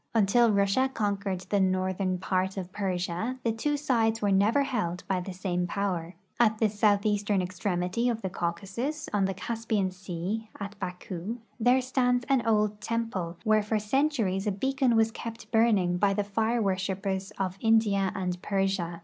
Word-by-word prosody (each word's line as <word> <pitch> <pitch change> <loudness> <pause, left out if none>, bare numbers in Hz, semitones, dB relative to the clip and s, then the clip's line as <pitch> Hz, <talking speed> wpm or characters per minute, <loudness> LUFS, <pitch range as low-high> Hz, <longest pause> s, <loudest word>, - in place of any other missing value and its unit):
Until 225 +2 +4
Russia 200 +6 +2
conquered 200 -5 -1
the 195 +2 0
northern 185 0 +1
part 190 +1 -1
of 185 -1 -5
Persia, 190 +4 -2
the 230 - +2
two 290 +7 -1
sides 230 -6 +1
were 205 -2 +1
never 210 +9 +4
held 210 -10 -2
by 190 -2 +1
the 185 +2 -6
same 180 -1 -2
power. 180 -3 -2 0.2
At 220 -2 +4
the 220 -1 +2
southeastern 205 -1 +2
extremity 180 +4 -1
of 230 -3 -2
the 190 - -1
Caucasus, 205 - -3
on 200 -2 +2
the 195 0 -2
Caspian 220 -2 -1
sea, 190 +4 -4
at 200 0 -5
Baku, 185 +3 -5 0.2
there 245 +3 +4
stands 250 -1 +1
an 265 -3 +3
old 210 -1 +2
temple, 210 -7 -2
where 215 -1 +4
for 215 +1 0
centuries 215 -4 0
a - - +2
beacon 265 +4 +1
was 225 0 +3
kept 230 0 -8
burning 210 -6 +3
by 195 0 +3
the 205 - +1
fire 225 +3 0
worshipers 195 0 -1
of 190 0 -2
India 215 -4 +3
and 180 -1 -3
Persia. 195 -4 -1
200 Hz, 165 wpm, -28 LUFS, 185-225 Hz, 0.2 s, Until